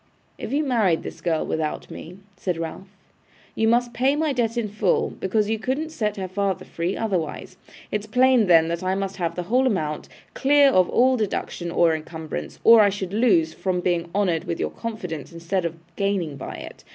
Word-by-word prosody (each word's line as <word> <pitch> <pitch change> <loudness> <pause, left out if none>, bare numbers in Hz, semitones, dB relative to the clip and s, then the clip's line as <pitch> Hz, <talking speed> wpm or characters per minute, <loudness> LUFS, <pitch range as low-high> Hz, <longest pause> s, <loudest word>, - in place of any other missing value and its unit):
'If - - -5
you 290 +3 +1
married 220 - +2
this - - -8
girl 165 -3 0
without 155 -1 -3
me,' 175 +3 -9 0.2
said 180 -3 -3
Ralph, 165 +4 -6 0.7
'you 220 - +1
must 240 +1 +2
pay 265 +3 +2
my 305 -1 0
debt 235 -2 -1
in 230 -2 0
full, 205 -2 0
because 210 +2 -1
you 220 0 -1
couldn't 275 +7 -2
set 210 -8 -2
her 190 -1 -3
father 195 0 -2
free 170 +3 -3
otherwise. 185 -4 -3 0.3
It's 210 0 -2
plain, 250 -1 +4
then, 165 -2 +6
that 170 +1 -2
I 185 +1 0
must 195 0 -3
have 170 -2 -2
the 180 - -3
whole 250 +8 +2
amount, 155 -10 -2 0.2
clear 280 0 +5
of 185 -5 +3
all 255 +1 +3
deduction 190 -5 -3
or 170 -1 +3
incumbrance, 160 0 -6
or 230 -1 +8
I 205 - +5
should 195 -1 -5
lose 190 -8 +3
from 185 -2 -1
being 175 -1 -1
honoured 180 -6 +1
with 170 - -3
your - - -1
confidence, 180 - -6
instead 170 +2 -2
of 165 0 -3 0.2
gaining 195 -7 -1
by 135 - -7
it. - - -10
195 Hz, 195 wpm, -23 LUFS, 170-230 Hz, 0.7 s, or